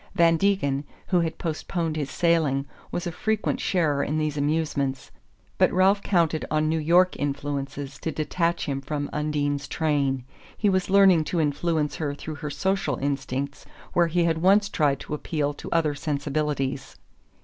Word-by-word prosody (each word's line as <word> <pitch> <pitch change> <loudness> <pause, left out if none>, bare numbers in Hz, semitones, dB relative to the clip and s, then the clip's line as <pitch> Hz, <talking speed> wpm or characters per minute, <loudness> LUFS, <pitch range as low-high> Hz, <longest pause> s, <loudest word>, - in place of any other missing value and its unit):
Van 170 -1 +5
Degen, 160 -7 +1 0.3
who 180 - +3
had 165 -1 -1
postponed 165 0 -2
his 145 -3 -2
sailing, 160 -5 +2 0.3
was 175 - -3
a 175 - -2
frequent 220 +5 -1
sharer 155 -6 +1
in 150 - -1
these 155 -1 -1
amusements; 145 -3 -1 0.5
but - - +5
Ralph 190 +3 +4
counted 165 -6 +1
on 155 0 +1
New 160 +1 +1
York 175 +4 +4
influences 140 -1 -3
to 160 - -3
detach 170 +2 -1
him 135 -2 -2
from 145 +1 -4
Undine's 145 -1 -1
train. 140 -5 0 0.3
He 210 - +2
was 185 0 0
learning 190 -5 +6
to 175 - -1
influence 155 0 0
her 145 -3 -2
through 155 +1 -7
her 150 - -3
social 155 0 0
instincts 140 0 -3 0.3
where 170 -1 +4
he 170 +1 +1
had 165 -1 +1
once 200 +4 +4
tried 145 -7 +1
to - - -6
appeal 150 -1 -1
to - - -9
other 160 -3 +2
sensibilities. 140 -2 -2
155 Hz, 160 wpm, -25 LUFS, 145-170 Hz, 0.5 s, learning